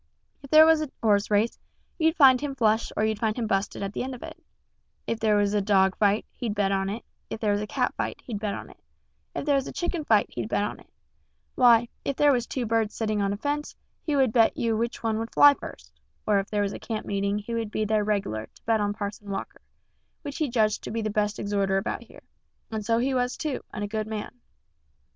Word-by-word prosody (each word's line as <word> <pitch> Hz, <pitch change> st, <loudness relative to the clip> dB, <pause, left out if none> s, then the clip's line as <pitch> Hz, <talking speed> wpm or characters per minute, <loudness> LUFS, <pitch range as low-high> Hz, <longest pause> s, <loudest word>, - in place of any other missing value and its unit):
If 275 Hz, -, -12 dB
there 310 Hz, +2 st, +8 dB
was 320 Hz, -1 st, +5 dB
a 305 Hz, -, -3 dB
horse 205 Hz, -2 st, +3 dB
race, 215 Hz, +2 st, +1 dB, 0.4 s
you'd 320 Hz, 0 st, +3 dB
find 265 Hz, -4 st, +7 dB
him 285 Hz, -2 st, -3 dB
flush 220 Hz, -2 st, +1 dB
or 215 Hz, -, +2 dB
you'd 220 Hz, -1 st, -1 dB
find 220 Hz, 0 st, 0 dB
him 235 Hz, -, -1 dB
busted 195 Hz, -1 st, -1 dB
at 195 Hz, +1 st, -4 dB
the -, -, -3 dB
end 260 Hz, 0 st, -4 dB
of 245 Hz, -, -11 dB
it; -, -, -10 dB, 0.6 s
if 230 Hz, -, -2 dB
there 215 Hz, -1 st, +3 dB
was 205 Hz, 0 st, +1 dB
a 205 Hz, -, +2 dB
dog 190 Hz, -2 st, +3 dB
fight, 205 Hz, 0 st, +2 dB
he'd 225 Hz, -4 st, -4 dB
bet 200 Hz, -2 st, +1 dB
on 195 Hz, 0 st, 0 dB
it; 220 Hz, +4 st, -5 dB, 0.2 s
if -, -, -5 dB
there 215 Hz, -2 st, +1 dB
was 205 Hz, 0 st, 0 dB
a 210 Hz, -, -4 dB
cat -, -, 0 dB
fight, -, -, -3 dB
he'd 220 Hz, -5 st, -5 dB
bet 210 Hz, -1 st, -2 dB
on -, -, -9 dB
it; -, -, -20 dB, 0.6 s
if -, -, -3 dB
there 290 Hz, -, +3 dB
was 275 Hz, -1 st, +1 dB
a -, -, -5 dB
chicken 345 Hz, -2 st, -3 dB
fight, 215 Hz, -7 st, +4 dB
he'd 115 Hz, -3 st, -4 dB
bet -, -, +1 dB
on 210 Hz, -, -4 dB
it; -, -, -19 dB, 0.6 s
why, 240 Hz, -2 st, +5 dB, 0.2 s
if 275 Hz, -, -2 dB
there 290 Hz, +1 st, +4 dB
was 245 Hz, -3 st, 0 dB
two 255 Hz, -3 st, -3 dB
birds 225 Hz, -1 st, 0 dB
setting 215 Hz, -2 st, -1 dB
on 200 Hz, 0 st, +1 dB
a 200 Hz, -, -2 dB
fence, 290 Hz, +5 st, -3 dB, 0.3 s
he 300 Hz, -, -1 dB
would 260 Hz, -5 st, +3 dB
bet 225 Hz, -2 st, +4 dB
you 230 Hz, -1 st, 0 dB
which 235 Hz, +2 st, -3 dB
one 220 Hz, -1 st, 0 dB
would 225 Hz, 0 st, -4 dB
fly 290 Hz, 0 st, +8 dB
first; -, -, -11 dB, 0.3 s
or 205 Hz, -2 st, +3 dB
if 195 Hz, -, -4 dB
there 205 Hz, -1 st, 0 dB
was 200 Hz, -, -2 dB
a -, -, -7 dB
camp 220 Hz, -2 st, -4 dB
meeting 200 Hz, 0 st, -1 dB
he 210 Hz, +3 st, -5 dB
would 230 Hz, -2 st, -2 dB
be 215 Hz, 0 st, -1 dB
there 215 Hz, 0 st, +1 dB
reg'lar 195 Hz, -, -2 dB
to -, -, -22 dB
bet 225 Hz, -1 st, +2 dB
on 205 Hz, 0 st, -1 dB
Parson 205 Hz, -1 st, -6 dB
Walker, 195 Hz, -, -5 dB, 0.6 s
which 285 Hz, -1 st, -6 dB
he 305 Hz, -3 st, 0 dB
judged 220 Hz, -3 st, +1 dB
to -, -, -7 dB
be 225 Hz, +1 st, -2 dB
the 215 Hz, -, -1 dB
best 210 Hz, 0 st, 0 dB
exhorter 200 Hz, -1 st, 0 dB
about 195 Hz, -, -2 dB
here, -, -, -15 dB, 0.5 s
and 220 Hz, -1 st, -3 dB
so 230 Hz, +2 st, +1 dB
he 260 Hz, +3 st, +1 dB
was 250 Hz, 0 st, 0 dB
too, 300 Hz, -5 st, -3 dB
and 210 Hz, -, -5 dB
a -, -, -2 dB
good 215 Hz, +1 st, -3 dB
man. 220 Hz, -1 st, -5 dB
220 Hz, 250 wpm, -26 LUFS, 205-245 Hz, 0.6 s, there